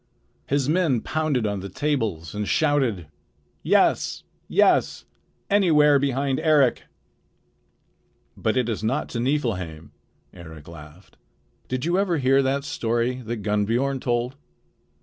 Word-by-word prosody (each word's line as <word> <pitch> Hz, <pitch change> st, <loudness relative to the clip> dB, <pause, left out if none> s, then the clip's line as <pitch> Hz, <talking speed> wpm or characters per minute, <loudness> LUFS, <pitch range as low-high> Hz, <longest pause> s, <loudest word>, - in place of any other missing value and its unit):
His 140 Hz, -1 st, 0 dB
men 155 Hz, -7 st, +1 dB
pounded 155 Hz, -7 st, -1 dB
on 100 Hz, -1 st, -2 dB
the 100 Hz, +1 st, -7 dB
tables 105 Hz, -, -2 dB
and 105 Hz, 0 st, -3 dB
shouted: 135 Hz, -, +1 dB, 0.6 s
"Yes! -, -, +2 dB, 0.2 s
Yes! -, -, +2 dB, 0.4 s
Anywhere 150 Hz, -8 st, +4 dB
behind 135 Hz, 0 st, 0 dB
Eric!" 150 Hz, -6 st, +2 dB, 1.5 s
"But 110 Hz, +3 st, -1 dB
it 125 Hz, -2 st, +1 dB
is 110 Hz, -2 st, -3 dB
not 125 Hz, +7 st, -1 dB
to 120 Hz, -, -4 dB
Niflheim," 100 Hz, -, -2 dB, 0.4 s
Eric 80 Hz, -4 st, -12 dB
laughed. 80 Hz, +2 st, -14 dB, 0.5 s
"Did 130 Hz, +1 st, -3 dB
you 175 Hz, +3 st, +1 dB
ever 185 Hz, -4 st, +1 dB
hear 135 Hz, 0 st, +3 dB
that 135 Hz, +1 st, 0 dB
story 120 Hz, -3 st, -1 dB
that 115 Hz, -2 st, -5 dB
Gunnbiorn 115 Hz, +6 st, 0 dB
told? 120 Hz, +1 st, -1 dB
125 Hz, 120 wpm, -24 LUFS, 105-145 Hz, 1.5 s, Anywhere